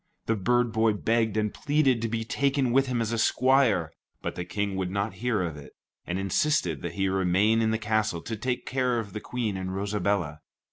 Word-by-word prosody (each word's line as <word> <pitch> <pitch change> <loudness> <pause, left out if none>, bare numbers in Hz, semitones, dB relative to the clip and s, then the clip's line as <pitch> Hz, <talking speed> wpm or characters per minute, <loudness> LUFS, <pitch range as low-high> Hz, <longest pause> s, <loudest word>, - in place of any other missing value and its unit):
The 115 - +1
bird 120 +3 +1
boy 110 -1 +3
begged 110 0 0
and 105 -1 0
pleaded 145 -5 +2
to 115 - -1
be 115 0 -2
taken 135 +2 +1
with 135 +2 +3
him 125 -2 0
as 115 - -3
his 115 -1 +1
squire, 130 - +3 0.3
but - - -2
the 90 - -4
King 100 +1 -2
would 95 -1 -2
not 100 +3 -2
hear 120 -6 +1
of 80 -4 -4
it, 70 - -12 0.3
and 90 - -2
insisted 95 - +1
that 85 -1 -4
he 95 0 +1
remain 95 +4 +2
in 110 - +2
the 110 - +1
castle 110 -5 0
to 115 - -4
take 125 +3 -3
care 130 -2 0
of 105 -4 -4
the 105 - -4
Queen 115 -4 -3
and 95 0 -4
Rosabella. 100 -6 -1
110 Hz, 215 wpm, -27 LUFS, 95-120 Hz, 0.3 s, boy